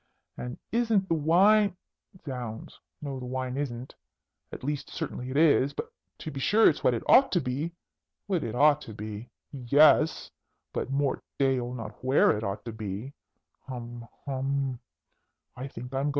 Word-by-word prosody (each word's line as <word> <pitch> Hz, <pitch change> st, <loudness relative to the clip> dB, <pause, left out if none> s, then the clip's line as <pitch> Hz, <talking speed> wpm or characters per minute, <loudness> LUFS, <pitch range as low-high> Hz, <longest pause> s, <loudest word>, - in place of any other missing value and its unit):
And 125 Hz, 0 st, -6 dB
isn't 225 Hz, -5 st, +2 dB
the 165 Hz, -, +1 dB
wine 185 Hz, +5 st, +4 dB, 0.5 s
Zounds, 125 Hz, -5 st, -6 dB, 0.2 s
no, 135 Hz, -2 st, -4 dB
the 125 Hz, -, -6 dB
wine 130 Hz, 0 st, -3 dB
isn't 130 Hz, -3 st, -4 dB, 0.6 s
at -, -, -8 dB
least, 145 Hz, +1 st, -3 dB
certainly 125 Hz, +1 st, -5 dB
it 130 Hz, -, -2 dB
is 145 Hz, -3 st, +4 dB, 0.4 s
to 155 Hz, -, -6 dB
be 135 Hz, -, -6 dB
sure 210 Hz, +11 st, +5 dB
it's 150 Hz, -, +2 dB
what 125 Hz, -, +4 dB
it 115 Hz, -, -4 dB
ought 270 Hz, +1 st, +6 dB
to 180 Hz, -, +4 dB
be 145 Hz, +4 st, -2 dB, 0.5 s
what 180 Hz, -6 st, 0 dB
it 115 Hz, -, -4 dB
ought 150 Hz, +2 st, +5 dB
to 110 Hz, -, -9 dB
be? 105 Hz, +3 st, -7 dB, 0.2 s
Yes! 145 Hz, +4 st, +4 dB, 0.4 s
But, -, -, -2 dB
Mort 140 Hz, 0 st, 0 dB, 0.2 s
d'aieul! 130 Hz, -3 st, +1 dB
not 110 Hz, -2 st, -8 dB
where 130 Hz, +2 st, +4 dB
it 105 Hz, -, -4 dB
ought 100 Hz, -1 st, -4 dB
to 115 Hz, -, -4 dB
be! 110 Hz, +4 st, -6 dB, 0.5 s
Hum! 120 Hz, -2 st, -7 dB, 0.2 s
hum! 135 Hz, -1 st, -1 dB
135 Hz, 150 wpm, -28 LUFS, 120-150 Hz, 0.6 s, ought